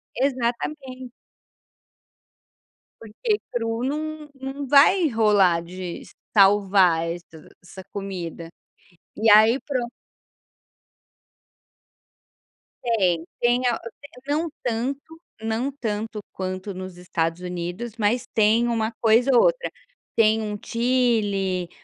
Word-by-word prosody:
Exatamente. 255 Hz, +1 st, -2 dB, 1.9 s
Porque 415 Hz, -, -2 dB
cru 230 Hz, 0 st, -2 dB
não 305 Hz, +2 st, -4 dB
não 270 Hz, +1 st, -6 dB
vai 310 Hz, +6 st, +6 dB
rolar 205 Hz, -8 st, +3 dB
de 180 Hz, 0 st, -7 dB, 0.3 s
salvar 195 Hz, -4 st, +4 dB
essa 165 Hz, -2 st, -8 dB, 0.2 s
essa 190 Hz, +1 st, -11 dB
comida, 175 Hz, -4 st, -6 dB, 0.7 s
e 225 Hz, 0 st, +3 dB
aí 220 Hz, +5 st, +7 dB
pronto. 250 Hz, -4 st, -3 dB, 2.9 s
Tem, 185 Hz, -8 st, +1 dB, 0.2 s
tem 245 Hz, +1 st, +2 dB
a 235 Hz, -, 0 dB, 0.5 s
não 315 Hz, +3 st, 0 dB
tanto, 275 Hz, +7 st, -3 dB, 0.2 s
não 225 Hz, +5 st, -1 dB
tanto 220 Hz, -4 st, -4 dB
quanto 185 Hz, +1 st, -5 dB
nos 185 Hz, -1 st, -8 dB
Estados 170 Hz, -1 st, -2 dB
Unidos, 180 Hz, +5 st, -5 dB
mas 230 Hz, +3 st, +1 dB
tem 225 Hz, +2 st, +3 dB
uma 225 Hz, -1 st, 0 dB
coisa 230 Hz, +4 st, +4 dB
ou -, -, +6 dB
outra, -, -, +1 dB, 0.4 s
tem 220 Hz, 0 st, +4 dB
um 210 Hz, -1 st, -4 dB
Chilli, 215 Hz, -7 st, 0 dB
225 Hz, 95 wpm, -23 LUFS, 190-255 Hz, 2.9 s, aí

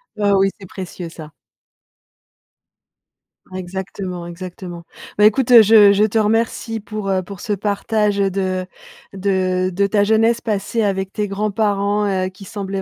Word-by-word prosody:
Bah 205 Hz, -1 st, +1 dB
oui, 195 Hz, 0 st, +3 dB
c'est 190 Hz, -, -11 dB
précieux 180 Hz, -2 st, -7 dB
ça. 155 Hz, -2 st, -11 dB, 2.2 s
Ah 185 Hz, -, -6 dB
exactement, 185 Hz, -1 st, -6 dB
exactement. 175 Hz, 0 st, -8 dB, 0.3 s
Bah, 210 Hz, -, +5 dB
écoute, 230 Hz, +4 st, +3 dB
heu, 235 Hz, -2 st, +10 dB
je 210 Hz, -1 st, +7 dB
je 205 Hz, -, +3 dB
te 215 Hz, +1 st, +1 dB
remercie 225 Hz, +1 st, 0 dB
pour, 210 Hz, -1 st, -5 dB
heu, 185 Hz, -1 st, 0 dB
pour 195 Hz, 0 st, -10 dB
ce 210 Hz, -, -2 dB
partage, 205 Hz, +1 st, 0 dB
heu, 195 Hz, -, +2 dB
de 185 Hz, -1 st, -2 dB, 0.5 s
de 185 Hz, -1 st, 0 dB
de 200 Hz, +2 st, +1 dB
ta 205 Hz, 0 st, +2 dB
jeunesse 225 Hz, +2 st, +3 dB
passée 220 Hz, 0 st, -1 dB
avec 190 Hz, -1 st, -1 dB
tes 210 Hz, -1 st, -2 dB
grands-parents, 205 Hz, 0 st, 0 dB, 0.2 s
heu, -, -, -3 dB
qui 195 Hz, +1 st, -14 dB
semblait 195 Hz, -1 st, -5 dB
200 Hz, 155 wpm, -19 LUFS, 185-210 Hz, 2.2 s, heu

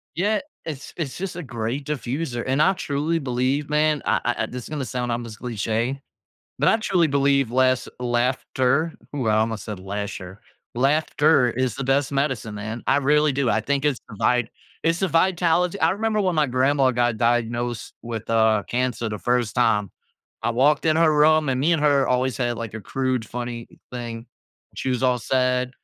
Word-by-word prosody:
Yeah. 210 Hz, +5 st, +1 dB, 0.3 s
It's 145 Hz, -4 st, -7 dB
it's 155 Hz, -6 st, -4 dB
just 185 Hz, -1 st, -4 dB
a 175 Hz, -, -5 dB
great 120 Hz, +2 st, -4 dB
diffuser, 135 Hz, -2 st, -3 dB
and 130 Hz, +3 st, +1 dB
I 190 Hz, +5 st, +4 dB
truly 160 Hz, -2 st, -1 dB
believe, 135 Hz, +1 st, -1 dB
man 150 Hz, 0 st, +2 dB
I -, -, +2 dB
I 120 Hz, -, +1 dB
I -, -, 0 dB
this 125 Hz, 0 st, -7 dB
is -, -, -10 dB
gonna 150 Hz, -2 st, -3 dB
sound 125 Hz, -1 st, -3 dB
almost 115 Hz, -2 st, -5 dB
cliche, 115 Hz, +2 st, -2 dB, 0.6 s
but -, -, +3 dB
I -, -, +5 dB
truly 185 Hz, -6 st, +2 dB
believe 140 Hz, -3 st, +2 dB
less 130 Hz, 0 st, +2 dB
laughter 125 Hz, +5 st, 0 dB, 0.2 s
ooh, 130 Hz, -5 st, -2 dB
I 110 Hz, -1 st, +3 dB
almost 110 Hz, -2 st, 0 dB
said 105 Hz, -3 st, -6 dB
lasher 95 Hz, -1 st, -6 dB, 0.4 s
laughter 140 Hz, 0 st, +3 dB
is 125 Hz, -1 st, -1 dB
the -, -, -3 dB
best 135 Hz, +1 st, +1 dB
medicine, 135 Hz, -6 st, -1 dB
man. 110 Hz, +3 st, -5 dB
I -, -, +4 dB
really 150 Hz, +1 st, +3 dB
do. 135 Hz, -1 st, 0 dB
I 110 Hz, -, +2 dB
think 140 Hz, +4 st, 0 dB
it's 140 Hz, -4 st, +1 dB
the -, -, -10 dB
vibe 125 Hz, 0 st, +2 dB, 0.3 s
it's 165 Hz, +1 st, +1 dB
the 190 Hz, -, +1 dB
vitali 175 Hz, +2 st, +2 dB
I -, -, +4 dB
remember 215 Hz, +2 st, 0 dB
when 185 Hz, -3 st, +1 dB
my 155 Hz, -2 st, +3 dB
grandma 130 Hz, +1 st, +2 dB
got 120 Hz, -2 st, +1 dB
diagnosed 120 Hz, 0 st, -1 dB
with, 115 Hz, -2 st, -6 dB
uh, 110 Hz, -2 st, +3 dB
cancer 125 Hz, -2 st, -1 dB
the 105 Hz, -1 st, -4 dB
1st 120 Hz, +3 st, 0 dB
time. 105 Hz, -5 st, +2 dB, 0.5 s
I -, -, +1 dB
walked 135 Hz, +5 st, +3 dB
in 155 Hz, -, +4 dB
her 165 Hz, -1 st, +4 dB
room 155 Hz, 0 st, +4 dB
and 130 Hz, -1 st, 0 dB
me 155 Hz, +6 st, +2 dB
and 160 Hz, -3 st, +1 dB
her 145 Hz, -2 st, +3 dB
always 125 Hz, +1 st, +1 dB
had, 120 Hz, -2 st, -1 dB
like, 115 Hz, -2 st, -6 dB
a 110 Hz, -, -5 dB
crude, 130 Hz, +2 st, -2 dB
funny 120 Hz, -1 st, -5 dB, 0.2 s
thing 120 Hz, -1 st, -6 dB, 0.5 s
she 130 Hz, -, -2 dB
was 125 Hz, 0 st, -1 dB
all 125 Hz, -1 st, +3 dB
sad, 125 Hz, +2 st, +1 dB
130 Hz, 190 wpm, -23 LUFS, 120-150 Hz, 0.6 s, I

